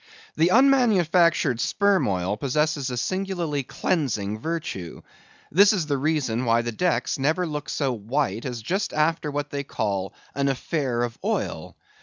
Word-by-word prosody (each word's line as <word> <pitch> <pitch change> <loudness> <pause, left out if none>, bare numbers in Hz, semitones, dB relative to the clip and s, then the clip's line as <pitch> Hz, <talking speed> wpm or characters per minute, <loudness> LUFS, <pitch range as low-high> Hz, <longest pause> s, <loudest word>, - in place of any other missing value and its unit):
The 165 +2 +3
unmanufactured 185 - +4
sperm 200 +4 +2
oil 95 0 -1
possesses 145 +3 0
a 125 - -4
singularly 175 -2 -2
cleansing 110 - -2
virtue. 155 - -5 0.5
This 200 +6 +6
is 185 -6 0
the 145 -2 0
reason 135 -6 0
why 115 0 +3
the 120 - -3
decks 175 +3 0
never 155 +7 +1
look 150 -3 -5
so 135 -4 0
white 115 0 -2
as 120 -3 -5
just 190 - -1
after 155 0 +1
what 145 0 -3
they 140 0 -3
call 100 -7 -3 0.2
an 140 0 0
affair 130 -3 -1
of 120 -1 -4
oil. - - -3
145 Hz, 150 wpm, -24 LUFS, 120-170 Hz, 0.5 s, This